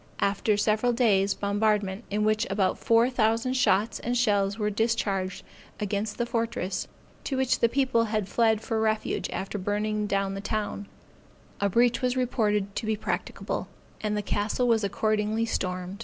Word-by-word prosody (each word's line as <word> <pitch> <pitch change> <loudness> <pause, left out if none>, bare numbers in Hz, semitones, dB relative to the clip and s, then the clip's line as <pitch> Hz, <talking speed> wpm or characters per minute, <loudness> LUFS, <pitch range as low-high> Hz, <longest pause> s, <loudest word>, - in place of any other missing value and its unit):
After 205 +1 +1
several 220 +3 +2
days 205 -5 +3
bombardment, 205 0 0
in 210 +1 0
which 215 0 +1
about 195 -1 +1
four 230 +1 +4
thousand 230 +1 +1
shot 220 -4 +2
and 245 +1 0
shells 205 -4 +2
were 210 -1 0
discharged 200 -4 -1 0.4
against 205 0 -2
the 240 - 0
fortress, 230 -5 -2 0.4
to 270 - -2
which 260 -3 +1
the 235 - +3
people 255 -3 +2
had 215 -3 -1
fled 220 0 +2
for 225 -1 -1
refuge 220 0 0
after 195 +2 -4
burning 210 +2 -1
down 195 -1 0
the 195 - -5
town, 210 -1 -3 0.7
a 200 - +1
breach 235 +5 +3
was 250 0 0
reported 210 -5 0
to 220 - -3
be 220 - +1
practicable, 210 - -3 0.3
and 210 -1 -1
the 210 - -2
castle 210 +5 0
was 225 -2 +3
accordingly 215 +2 0
stormed. 185 -2 -3
215 Hz, 160 wpm, -27 LUFS, 200-230 Hz, 0.7 s, four